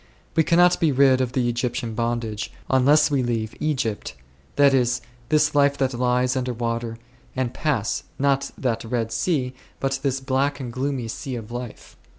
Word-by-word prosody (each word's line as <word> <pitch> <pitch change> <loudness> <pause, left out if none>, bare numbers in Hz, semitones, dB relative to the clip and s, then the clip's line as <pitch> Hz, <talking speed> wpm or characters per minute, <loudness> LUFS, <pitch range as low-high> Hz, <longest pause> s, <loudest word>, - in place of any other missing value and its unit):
We 160 - +5
cannot 175 +2 +4
be 160 -3 +3
rid 130 -1 +4
of 125 -1 -2
the 125 -2 +1
Egyptian 120 -1 -2
bondage, 115 -2 -2 0.2
unless 145 +3 +5
we 140 -2 +2
leave 115 -3 -2
Egypt, 130 - -2 0.4
that 140 -1 +5
is, 125 -1 +2 0.3
this 155 -1 +3
life 140 -1 +3
that 135 -1 0
lies 125 +1 +1
under 125 -1 -1
water 115 -1 -3 0.2
', 125 - -31
and 130 -2 -1
pass, 125 -10 -1
not 140 0 +1
that 115 -3 -1
Red 115 -1 -2
Sea, 130 -1 0 0.3
but 135 0 -1
this 135 -1 0
black 135 +2 0
and 125 -3 -6
gloomy 130 -2 -2
Sea 130 +3 -5
of 115 -1 -7
life. 120 -1 -8
130 Hz, 170 wpm, -23 LUFS, 120-140 Hz, 0.4 s, We